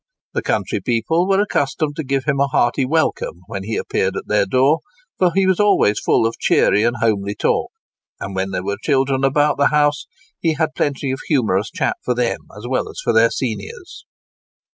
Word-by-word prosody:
The - - -1
country - - -1
people 145 +10 0
were 195 0 +3
accustomed 145 -5 -1
to 160 - -2
give 135 -1 -1
him 140 -2 0
a 140 - +3
hearty 130 0 +1
welcome 155 - -1
when 100 -1 -6
he 110 +3 -4
appeared 95 - -1
at - - -5
their 105 -1 +1
door; 135 +8 +3 0.4
for 180 -2 +3
he 195 0 +3
was 190 -1 +2
always 200 - +3
full - - +2
of 115 - -2
cheery 105 - +3
and 120 +2 +1
homely 100 -2 0
talk, - - 0 0.5
and, 95 -1 -6
when 95 +1 -1
there 95 -1 -3
were 100 +1 -2
children 135 -2 +1
about 145 +2 +2
the 140 - +5
house, 145 -1 +1 0.3
he 165 -2 +1
had 160 0 -1
plenty 140 -2 -1
of 135 - -3
humorous 110 -8 +1
chat - - -2
for 125 - 0
them 120 -1 0 0.2
as 105 - -9
well 130 +1 -1
as - - -9
for - - +1
their 115 +1 +5
seniors. 110 -7 -6
130 Hz, 200 wpm, -19 LUFS, 110-150 Hz, 0.5 s, the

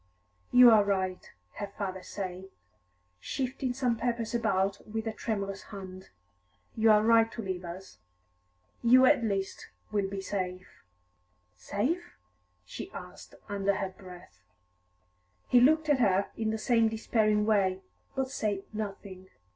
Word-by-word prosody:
"You 250 -1 +9
are 215 -2 +6
right," 190 -2 -2 0.3
her 205 - -3
father 195 -2 -5
said, 185 -1 -6 0.7
shifting 260 - -3
some 245 -2 0
papers 235 -1 -2
about 200 -4 0
with 220 +1 -4
a 225 - -2
tremulous 200 -3 -4
hand. 190 -2 -10 0.7
"You 225 0 +3
are 210 0 +6
right 225 0 +4
to 230 - -5
leave 185 -2 -4
us. 170 - -9 0.8
You 255 +2 +6
at 275 -3 +4
least 195 -3 -3 0.2
will 200 -2 0
be 195 0 -4
safe." 185 -2 -5 0.7
"Safe?" 250 - -2 0.5
she 90 - -8
asked, - - -10
under 200 -1 0
her 195 - -2
breath. 180 - -14 1.1
He 245 - +5
looked 310 +4 +4
at 290 -3 +3
her 195 -4 +2
in 220 -1 -1
the 220 - -1
same 230 0 +2
despairing 215 -1 +1
way, 190 -3 +2 0.3
but 265 -1 -1
said 205 -6 -2
nothing. 195 -3 -6
210 Hz, 135 wpm, -29 LUFS, 190-230 Hz, 1.1 s, You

